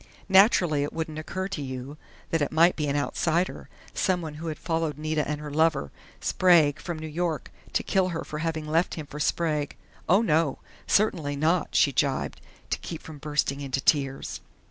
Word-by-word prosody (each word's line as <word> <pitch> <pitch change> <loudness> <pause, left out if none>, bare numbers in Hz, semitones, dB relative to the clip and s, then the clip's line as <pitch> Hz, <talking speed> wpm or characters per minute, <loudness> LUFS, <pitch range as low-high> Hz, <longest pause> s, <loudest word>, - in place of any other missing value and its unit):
Naturally 190 -6 +5
it 145 - -2
wouldn't 160 -1 -4
occur 185 +4 -4
to 190 -6 -4
you 130 +1 -6 0.4
that 165 - +1
it 145 - 0
might 165 +3 +5
be 150 -2 -1
an 140 - 0
outsider, 170 +4 0 0.2
someone 175 -5 0
who 165 - -4
had 155 -2 -3
followed 165 -3 -1
Nita 155 0 -1
and 150 -1 -2
her 150 -1 -7
lover, 155 - +2 0.3
Sprague, 165 -6 +4
from 175 -3 -5
New 155 - -6
York, 160 +1 -2 0.2
to - - +1
kill 190 -2 +2
her 165 -2 -3
for 150 - -6
having 160 -1 -2
left 165 +3 +1
him 155 - -6
for 145 +1 -9
Sprague.... 150 -1 0 0.3
Oh, 195 +6 +5
no! 160 -6 +2 0.3
Certainly 170 -9 +2
not!" 160 +4 +1
she 140 - +5
gibed, 135 0 -1 0.3
to - - 0
keep 165 - -7
from 155 -2 -10
bursting 145 -1 -1
into 135 -1 -2
tears. 135 -2 0
155 Hz, 185 wpm, -27 LUFS, 145-170 Hz, 0.4 s, Naturally